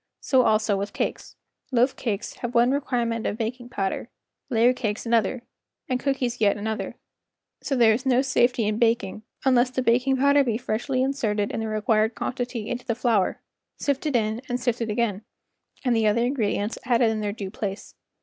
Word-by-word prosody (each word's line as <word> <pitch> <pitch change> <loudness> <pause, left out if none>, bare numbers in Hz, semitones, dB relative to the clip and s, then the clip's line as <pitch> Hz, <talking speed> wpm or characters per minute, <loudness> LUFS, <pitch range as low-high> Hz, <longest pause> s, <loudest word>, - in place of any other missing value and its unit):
So 260 -2 +3
also 215 -3 +2
with 200 +1 -4
cakes. - - -3 0.4
Loaf 250 +1 +3
cakes 215 -4 -3
have 240 0 -5
one 240 +2 +5
requirement 240 -5 -1
of 210 - -2
baking 240 +2 -4
powder, 195 +1 -3 0.4
layer 240 0 +4
cakes 220 -4 -3
another, 230 +1 +1 0.4
and 255 -1 0
cookies 250 -4 -1
yet 205 -1 +3
another; 220 +1 -3 0.7
so 275 - -1
there 230 -3 +5
is 240 +4 -2
no 260 -1 +3
safety 245 -3 +2
in 210 +1 -1
baking 225 -4 +1 0.2
unless 255 -1 +4
the 255 0 -2
baking 255 +3 +3
powder 280 +1 +4
be 230 -4 0
freshly 255 +2 -1
in¬ 265 - +2
serted 210 -7 -1
in - - -3
the 225 - -2
required 215 +1 +1
quantity 245 -3 -3
into 245 0 -4
the 230 - -1
flour, 225 -5 +1 0.4
sifted 285 0 -1
in 220 0 0
and 245 0 -1
sifted 240 -2 -1
again, 215 -2 -1 0.6
and 245 -2 +3
the 220 -1 +3
other 220 +3 +2
ingredients 220 -4 -1
added 235 -2 +3
in 220 - -2
their 205 -1 -1
due 200 -2 -6
place. 200 -1 -5
235 Hz, 180 wpm, -25 LUFS, 215-255 Hz, 0.7 s, one